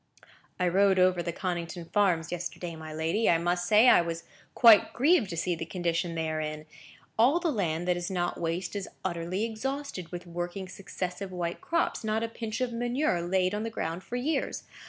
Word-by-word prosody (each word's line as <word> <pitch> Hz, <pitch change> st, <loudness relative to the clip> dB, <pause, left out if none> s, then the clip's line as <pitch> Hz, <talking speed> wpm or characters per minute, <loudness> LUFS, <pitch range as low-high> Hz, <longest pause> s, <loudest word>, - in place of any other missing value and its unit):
"I 180 Hz, -, +2 dB
rode 190 Hz, +2 st, +4 dB
over 185 Hz, -1 st, +4 dB
the 170 Hz, 0 st, -2 dB
Connington 175 Hz, -1 st, -4 dB
farms 180 Hz, -6 st, +2 dB
yesterday, 175 Hz, -1 st, -5 dB
my 160 Hz, -1 st, -8 dB
lady. 160 Hz, +8 st, +1 dB
I 170 Hz, -, +5 dB
must 175 Hz, +1 st, 0 dB
say 215 Hz, +3 st, +6 dB
I -, -, +7 dB
was 170 Hz, 0 st, -4 dB, 0.3 s
quite 230 Hz, -4 st, +7 dB
grieved 275 Hz, -, +3 dB
to 170 Hz, -, -5 dB
see 175 Hz, +2 st, 0 dB
the 165 Hz, -, -4 dB
condition 170 Hz, 0 st, -2 dB
they 160 Hz, -1 st, -1 dB
are 155 Hz, 0 st, -2 dB
in; 155 Hz, 0 st, -5 dB, 0.5 s
all 265 Hz, +9 st, +5 dB
the 340 Hz, -2 st, 0 dB
land 175 Hz, -, -1 dB
that 180 Hz, -1 st, +2 dB
is 175 Hz, 0 st, -3 dB
not 175 Hz, -2 st, -2 dB
waste 170 Hz, +3 st, -2 dB
is 200 Hz, -2 st, -4 dB, 0.2 s
utterly 175 Hz, +2 st, -2 dB
exhausted 230 Hz, -, -4 dB
with 175 Hz, 0 st, -6 dB
working 175 Hz, +2 st, -5 dB
successive 190 Hz, 0 st, -5 dB
white 175 Hz, -1 st, -3 dB
crops. 335 Hz, -6 st, 0 dB
Not 220 Hz, +1 st, 0 dB
a -, -, 0 dB
pinch 225 Hz, +1 st, -5 dB
of 250 Hz, -2 st, -1 dB
manure 240 Hz, -, 0 dB
laid 185 Hz, +2 st, +1 dB
on 210 Hz, -, -1 dB
the 225 Hz, -, -2 dB
ground 170 Hz, -4 st, -4 dB
for 235 Hz, -, -6 dB
years. 275 Hz, +3 st, -1 dB
180 Hz, 200 wpm, -29 LUFS, 170-220 Hz, 0.5 s, I